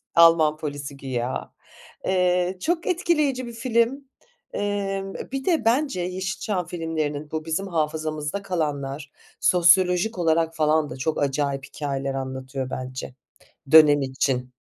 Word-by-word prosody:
Alman 165 -2 +6
polisi 145 -2 -6
güya. 130 -2 -4 0.5
Eee, 180 0 +1
çok 340 +2 -1
etkileyici 305 -8 +1
bir 235 - -8
film. 245 +3 0 0.4
Emm, 195 -1 -2 0.2
bir 270 0 -3
de 325 -10 +1
bence 245 -5 +2
Yeşilçam 185 +1 -2
filmlerinin 155 -3 -3
bu 155 0 -3
bizim 185 +5 -2
hafızamızda 155 +1 -2
kalanlar 145 -6 -3 0.3
sosyolojik 180 +3 +4
olarak 165 -1 +2
falan 155 -1 +2
da 130 - -7
çok 150 +3 -1
acayip 140 -1 -1
hikayeler 135 -2 -3
anlatıyor 130 0 -4
bence 130 0 -6 0.6
dönem 150 -2 +8
için. 130 -1 -1
160 Hz, 120 wpm, -24 LUFS, 140-195 Hz, 0.6 s, dönem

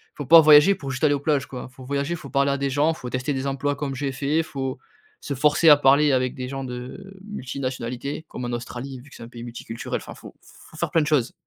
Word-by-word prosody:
faut 145 - -6
pas 165 +4 +9
voyager 155 +5 +7
pour 140 -7 -6
juste 130 +2 -5
aller 150 -2 +4
aux 145 - -1
plages, 145 -1 0
quoi, 130 0 -8
faut 130 +1 -14
voyager, 140 +5 -2
faut 150 -4 -10
parler 140 0 +2
à 140 - 0
des 140 0 -1
gens, 145 +4 +2
faut 125 -5 -8
tester 130 +3 -2
des 135 0 -3
emplois 140 +1 -1
comme 140 -1 -4
j'ai 135 0 -2
fait, 145 +5 0
faut 135 -4 -4 0.4
se - - -4
forcer 150 +4 +4
à 150 - +9
parler 145 +1 +4
avec 130 -1 +1
des 125 -1 -5
gens 135 +1 -5
de 130 +10 -8
multinationalité, 130 - -5
comme 125 - -6
en 120 - -3
Australie 125 +2 -6
vu 140 - -17
que - - -15
c'est - - -10
un - - -9
pays 120 -1 -10
multiculturel, 115 -1 -5
enfin - - -10
faut - - -13
faut - - -17
faire - - -2
plein 165 - +3
de 150 - -1
choses. 145 -6 +1
140 Hz, 255 wpm, -23 LUFS, 130-150 Hz, 0.4 s, pas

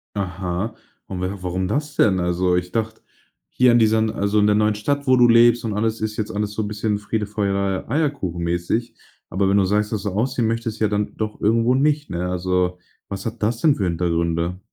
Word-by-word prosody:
Aha. 95 +2 -3 0.3
Und 90 -2 -5
wa 95 +2 -3
warum 90 +1 -2
das 150 +6 -2
denn? 95 -4 +3
Also, 90 +1 +1
ich 90 0 -2
dachte, 110 -1 -3 0.5
hier 125 -1 +4
in 120 - +5
diesen 110 0 +3
also 100 +1 0
in 105 - +4
der 105 - +3
neuen 105 0 +2
Stadt, 140 +7 -2
wo 130 - +6
du 120 - +6
lebst 120 0 +5
und 110 - -2
alles, 110 +1 -1
ist 110 0 -3
jetzt 110 0 -3
alles 105 0 -2
so 110 - -2
'n 105 - -3
bisschen 105 0 -1
Friede, 105 +1 -3
Freude, 100 -2 -1
Eierkuchen 135 - -1
mäßig, 85 +8 -2 0.3
aber 95 +2 +1
wenn 100 - +3
du 95 - +3
sagst, 105 +2 0
dass 110 -3 -2
du 105 - -1
ausziehen 115 +3 0
möchtest 115 -1 -3
ja 110 - +3
dann 105 0 -2
doch 110 -1 -4
irgendwo 115 +3 +3
nicht, 150 +2 +1
ne? 90 +1 -3
Also, 90 0 -1 0.3
was 100 -1 -6
hat 115 -1 -5
das 115 +2 0
denn 155 -4 +4
für 100 - -2
Hintergründe? 85 +1 -1
105 Hz, 215 wpm, -21 LUFS, 95-115 Hz, 0.5 s, wo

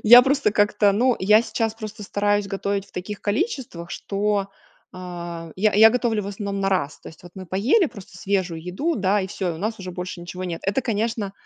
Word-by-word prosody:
Я 240 +3 +10
просто 270 -4 +2
как-то 205 -1 +3
ну 245 +4 +2
я 210 +4 +5
сейчас 225 -2 -2
просто 215 -1 -8
стараюсь 205 0 0
готовить 200 0 -2
в - - -24
таких 195 +3 -6
количествах, 215 - -2
что, 200 0 -1 0.4
э, - - -13 0.6
я 210 +2 +2
я 220 +2 +8
готовлю 225 -3 0
в - - -7
основном 200 0 -4
на 195 - +1
раз. 155 -6 -1
То - - -10
есть 160 - -15
вот 175 -1 -13
мы 190 -1 -8
поели 240 - +3
просто 200 -7 -12
свежую 185 -4 -1
еду, 245 - -2
да 200 0 +2
и 190 - -2
всё, 185 -2 -3
у 160 - -8
нас 220 +3 -3
уже 185 -1 -6
больше 180 0 -6
ничего 180 +2 -6
нет. 170 -2 -4
Это 200 +7 +1
конечно, 220 -3 -2
205 Hz, 210 wpm, -23 LUFS, 190-220 Hz, 0.6 s, Я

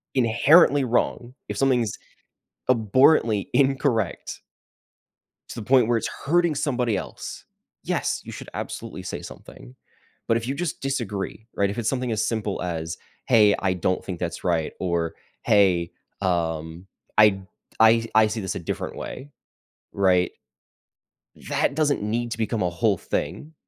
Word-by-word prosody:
inherently 135 +4 +5
wrong, 120 0 -1 0.2
if - - -4
something's 125 -6 +1 0.7
abhorrently 115 -2 +3
incorrect 135 -4 +1 1.1
to - - -7
the 105 - -7
point 125 -2 +4
where 120 - +2
it's 115 - -2
hurting 170 +1 +1
somebody 125 -6 0
else 95 - -6 0.4
yes, - - -1
you - - -7
should - - -9
absolutely - - -6
say - - -6
something, - - -12 0.5
but 115 - +3
if 115 0 -1
you - - 0
just 165 +2 -4
disagree, 110 -5 -3
right? 100 0 +1
If 100 - -5
it's 115 - -2
something 125 -2 -1
as 110 -1 0
simple 105 -4 -2
as, 80 -2 -4 0.3
"Hey, 105 -4 +5
I 95 -2 0
don't 90 +1 -1
think 90 -3 -6
that's 85 -1 -4
right," 85 -3 0
or 85 -3 -1 0.3
"Hey, 90 -4 +3 0.3
um, 85 -1 -2 0.3
I 105 -3 +6 0.4
I 115 +1 +5
I 110 0 +6
see 110 +1 -3
this 95 - -3
a - - -3
different 85 - -5
way." 145 +2 -7 0.6
Right? 90 -2 +3 1.2
That 140 - +1
doesn't 150 -2 +1
need 115 +3 -2
to 115 - -4
become 110 -2 -1
a 90 - +1
whole 100 +4 +1
thing. 155 - -4
110 Hz, 145 wpm, -24 LUFS, 95-125 Hz, 1.2 s, I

